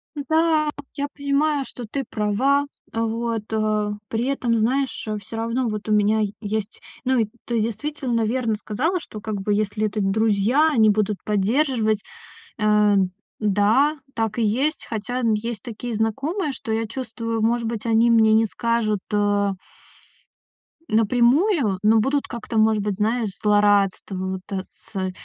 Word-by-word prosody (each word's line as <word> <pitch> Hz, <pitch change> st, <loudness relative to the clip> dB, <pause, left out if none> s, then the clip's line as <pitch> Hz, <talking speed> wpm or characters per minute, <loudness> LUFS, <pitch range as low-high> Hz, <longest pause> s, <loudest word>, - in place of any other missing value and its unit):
Да, 315 Hz, +1 st, +2 dB, 0.3 s
я 285 Hz, 0 st, -2 dB
понимаю, 285 Hz, 0 st, +1 dB
что 245 Hz, -, -8 dB
ты 275 Hz, +4 st, -3 dB
права. 255 Hz, +7 st, +1 dB, 0.3 s
А, 225 Hz, 0 st, -1 dB
вот, 230 Hz, -1 st, -2 dB
э. 215 Hz, -1 st, 0 dB, 0.2 s
При 225 Hz, +2 st, -1 dB
этом, 250 Hz, -4 st, 0 dB
знаешь, 255 Hz, +2 st, 0 dB
э, 215 Hz, 0 st, -2 dB
всё 205 Hz, +3 st, -8 dB
равно 230 Hz, +2 st, -1 dB
вот 215 Hz, 0 st, -5 dB
у 215 Hz, -, +2 dB
меня 210 Hz, +1 st, +3 dB, 0.2 s
есть. 215 Hz, 0 st, -4 dB, 0.2 s
Ну 260 Hz, 0 st, +2 dB
и 220 Hz, -, +1 dB, 0.2 s
ты 235 Hz, -2 st, 0 dB
действительно 235 Hz, +1 st, -2 dB
верно 230 Hz, -1 st, 0 dB
сказала, 285 Hz, -, -1 dB
что 215 Hz, -9 st, -10 dB
как 215 Hz, -2 st, -3 dB
бы 205 Hz, +1 st, 0 dB
если 215 Hz, +1 st, 0 dB
это 210 Hz, 0 st, -3 dB
друзья, 220 Hz, +8 st, +3 dB
они 220 Hz, -5 st, +4 dB
будут 210 Hz, -1 st, +1 dB
поддерживать, 220 Hz, +1 st, +1 dB, 0.6 s
э. 210 Hz, -1 st, +4 dB, 0.5 s
Да, 220 Hz, +9 st, +3 dB, 0.2 s
так 225 Hz, 0 st, -2 dB
и -, -, +2 dB
есть. 265 Hz, +9 st, 0 dB
Хотя 245 Hz, +3 st, -3 dB
есть 220 Hz, -1 st, -4 dB
такие 235 Hz, +1 st, -5 dB
знакомые, 275 Hz, -, -1 dB
что 225 Hz, -, -7 dB
я 225 Hz, 0 st, 0 dB
чувствую, 230 Hz, -2 st, -4 dB
может 235 Hz, +1 st, +1 dB
быть, 230 Hz, 0 st, -4 dB
они 230 Hz, +1 st, +4 dB
мне 220 Hz, -1 st, +5 dB
не 225 Hz, 0 st, +4 dB
скажут, 215 Hz, 0 st, 0 dB
а 205 Hz, -1 st, +2 dB, 1.3 s
напрямую, 240 Hz, -, +3 dB
но 220 Hz, +1 st, +5 dB
будут 275 Hz, +5 st, 0 dB
как-то, 235 Hz, -2 st, -5 dB
может 215 Hz, -1 st, +3 dB
быть, 205 Hz, -2 st, -1 dB
знаешь, 220 Hz, +1 st, 0 dB
злорадство 205 Hz, -2 st, +2 dB
вот, 190 Hz, 0 st, -3 dB
э, 190 Hz, -1 st, -2 dB
цэ 190 Hz, -3 st, -5 dB
225 Hz, 150 wpm, -23 LUFS, 210-250 Hz, 1.3 s, мне